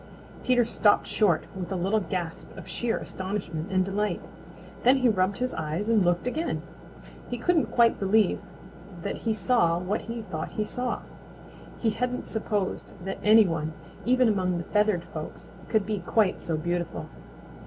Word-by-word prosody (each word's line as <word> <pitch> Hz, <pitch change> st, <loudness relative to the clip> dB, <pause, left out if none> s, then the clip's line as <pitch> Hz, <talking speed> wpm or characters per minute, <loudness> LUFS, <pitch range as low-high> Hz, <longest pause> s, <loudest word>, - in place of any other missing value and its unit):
Peter 245 Hz, -2 st, +4 dB
stopped 215 Hz, -2 st, +3 dB
short 190 Hz, -7 st, +2 dB
with 185 Hz, 0 st, -5 dB
a -, -, 0 dB
little 195 Hz, +5 st, +1 dB
gasp 180 Hz, -4 st, -4 dB
of -, -, -9 dB
sheer 235 Hz, -1 st, -1 dB
astonishment 185 Hz, -3 st, -4 dB
and 185 Hz, -1 st, +3 dB
delight. 200 Hz, -1 st, -1 dB, 0.6 s
Then 255 Hz, +3 st, +5 dB
he 255 Hz, -1 st, +3 dB
rubbed 190 Hz, -1 st, +1 dB
his 255 Hz, 0 st, -1 dB
eyes 160 Hz, +6 st, -2 dB
and 225 Hz, -3 st, +4 dB
looked 175 Hz, +2 st, +1 dB
again. 310 Hz, +7 st, -2 dB, 0.7 s
He 245 Hz, -, -2 dB
couldn't 325 Hz, +6 st, +2 dB
quite 235 Hz, -1 st, +3 dB
believe 205 Hz, 0 st, +3 dB, 0.6 s
that -, -, -2 dB
he 225 Hz, -1 st, -1 dB
saw 185 Hz, -5 st, +3 dB
what 185 Hz, +5 st, -1 dB
he 230 Hz, 0 st, -5 dB
thought 160 Hz, -6 st, -5 dB
he 215 Hz, -, -1 dB
saw. 245 Hz, +3 st, -2 dB, 0.8 s
He 225 Hz, -, +1 dB
hadn't 250 Hz, +3 st, -2 dB
supposed 210 Hz, -3 st, -2 dB
that 195 Hz, -, -4 dB
any 215 Hz, +1 st, +7 dB
one, 160 Hz, -3 st, -2 dB, 0.3 s
even 255 Hz, +1 st, +4 dB
among 185 Hz, -4 st, +1 dB
the 170 Hz, -, -3 dB
feathered 210 Hz, -2 st, +2 dB
folks, 155 Hz, -2 st, -8 dB, 0.2 s
could 215 Hz, -3 st, +2 dB
be 210 Hz, -1 st, -1 dB
quite 185 Hz, +2 st, +1 dB
so 165 Hz, -2 st, -1 dB
beautiful. 170 Hz, +1 st, -2 dB
205 Hz, 165 wpm, -27 LUFS, 175-230 Hz, 0.8 s, any